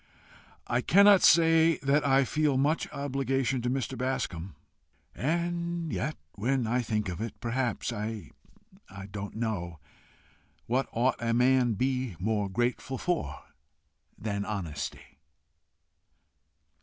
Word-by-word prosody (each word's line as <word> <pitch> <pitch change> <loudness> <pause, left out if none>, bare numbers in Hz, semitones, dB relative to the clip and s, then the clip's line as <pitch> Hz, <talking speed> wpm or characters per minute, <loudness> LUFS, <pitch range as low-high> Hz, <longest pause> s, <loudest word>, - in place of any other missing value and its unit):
"I 120 +1 0
cannot 200 +5 +6
say 165 -1 +5
that 140 +2 +3
I 135 -1 +4
feel 150 -1 +1
much 145 +4 +1
obligation 135 -2 -1
to 120 - -1
Mr. 130 0 -2
Bascombe. 100 - -3 0.6
And 170 - -2
yet 150 +4 -2
when 125 +4 0
I 120 +3 +1
think 105 -3 -1
of 90 +2 -5
it, 115 -1 -5
perhaps 120 0 -2
I 110 -1 -5 0.8
don't 100 0 -6
know 100 -8 -3 0.9
what 130 +3 0
ought 120 +2 +1
a 115 0 +1
man 125 -1 +3
to - - -4
be 130 -2 -1
more 105 +2 -1
grateful 120 +5 -1
for 175 +5 -2 0.7
than 100 -2 -3
honesty?" 90 -9 -5
125 Hz, 120 wpm, -29 LUFS, 110-140 Hz, 0.9 s, cannot